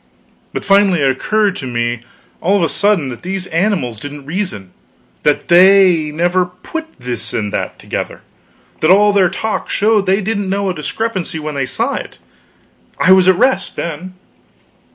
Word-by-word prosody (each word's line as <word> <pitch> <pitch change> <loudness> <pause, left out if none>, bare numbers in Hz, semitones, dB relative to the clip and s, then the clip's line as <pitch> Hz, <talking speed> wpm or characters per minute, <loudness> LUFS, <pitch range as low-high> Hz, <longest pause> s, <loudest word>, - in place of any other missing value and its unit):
But - - -5
finally 195 -4 +4
it 135 -1 +3
occurred 205 +8 0
to 130 - -6
me 120 -1 -2 0.4
all 195 +4 +2
of 185 - +1
a 165 - +1
sudden 200 -9 +1
that 120 - -8
these 190 +1 -4
animals 165 - -1
didn't 145 +1 -8
reason; 155 - -4 0.5
that 150 - +1
they 180 -3 +5
never 175 +4 +1
put 320 - -7
this 120 -1 -5
and 105 -2 -2
that - - -3
together; - - -5 0.6
that 155 - +2
all 205 +2 +5
their 190 -3 +4
talk 210 +4 -3
showed 210 -1 +2
that - - +3
they 195 - +3
didn't 205 -1 -2
know 200 0 -1
a - - -1
discrepancy 185 +2 -3
when 155 -1 -5
they 135 -2 -2
saw - - -1
it. - - -6 0.8
I 185 - +4
was 190 -1 +6
at 185 - +6
rest, 250 -3 +1
then. 170 +3 -5
185 Hz, 175 wpm, -16 LUFS, 150-200 Hz, 0.8 s, was